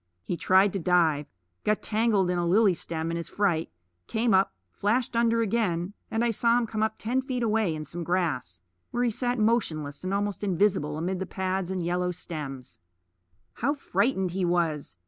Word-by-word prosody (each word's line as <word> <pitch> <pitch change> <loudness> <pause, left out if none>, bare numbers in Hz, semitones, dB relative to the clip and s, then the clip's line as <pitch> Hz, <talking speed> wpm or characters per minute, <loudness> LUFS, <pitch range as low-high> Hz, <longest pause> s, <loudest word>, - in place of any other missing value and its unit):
He 175 - -2
tried 190 +3 +4
to 195 - -1
dive; 160 -4 +2 0.4
got 210 0 +1
tangled 210 -4 +2
in 175 - 0
a 175 - 0
lily 200 +2 +5
stem 165 -1 -3
in 170 - -2
his 170 - -5
fright; 175 -6 0 0.4
came 225 -1 +1
up, 190 +1 +4 0.2
flashed 230 +4 0
under 230 0 +3
again; 195 -5 0 0.2
and 225 +1 0
I 235 - +2
saw 230 +2 +3
him 245 - +1
come 220 -1 -3
up 220 0 +1
ten 250 +4 0
feet 255 -2 -3
away 215 -6 +1
in 155 0 -5
some 170 +4 -4
grass, 155 - -1 0.3
where 245 - -1
he 240 - +2
sat 245 +3 -1
motionless 175 -11 0
and 185 - -2
almost 205 +1 -1
invisible 180 -6 +1
amid 180 +3 -2
the 190 - -3
pads 190 -1 -2
and 185 -2 -2
yellow 180 +1 0
stems. 150 -7 -6 0.7
How 280 +6 0
frightened 210 -9 0
he 185 +1 -2
was! 165 - 0
190 Hz, 185 wpm, -27 LUFS, 170-220 Hz, 0.7 s, lily